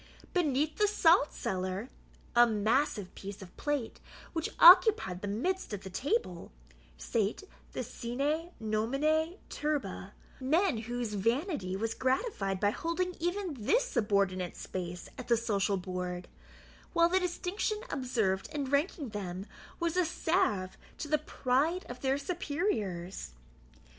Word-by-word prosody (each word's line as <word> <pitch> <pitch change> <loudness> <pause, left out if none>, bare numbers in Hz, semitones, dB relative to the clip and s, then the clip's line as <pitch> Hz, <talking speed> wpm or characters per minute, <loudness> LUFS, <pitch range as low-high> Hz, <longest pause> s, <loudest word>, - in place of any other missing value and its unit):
Beneath 305 -3 +1
the 420 - +4
salt 340 -6 +4
cellar 185 +4 -3 0.5
(a 240 0 +8
massive 215 -1 +1
piece 200 0 -8
of 180 - -14
plate 290 -6 -2 0.3
which 325 -1 -1
occupied 350 - +8
the 205 - -3
midst 260 - -1
of 200 - -5
the 190 - -7
table) 220 - -1 0.5
sate - - -1 0.3
the - - -2
SINE 285 +8 -2
NOMINE 275 +10 +1
TURBA, 275 -10 -3 0.3
men 305 - +2
whose 240 -1 -3
vanity 230 - 0
was 225 +3 -1
gratified 255 - 0
by 205 +1 +3
holding 360 +7 -2
even 350 +1 -1
this 395 - +2
subordinate 200 - 0
space 175 -1 -5
at 255 - -7
the 235 - +4
social 200 -3 +1
board, 180 -1 -4 0.7
while 335 0 +5
the 370 +2 +3
distinction 365 +4 -1
observed 225 -8 0
in 295 -3 -2
ranking 285 -1 0
them 190 -2 -5 0.3
was 340 -1 0
a 365 - +4
salve 320 - 0 0.2
to - - -4
the 305 0 +2
pride 290 +8 0
of 245 0 -8
their 270 0 +2
superiors. 275 - -2
255 Hz, 130 wpm, -31 LUFS, 200-330 Hz, 0.7 s, a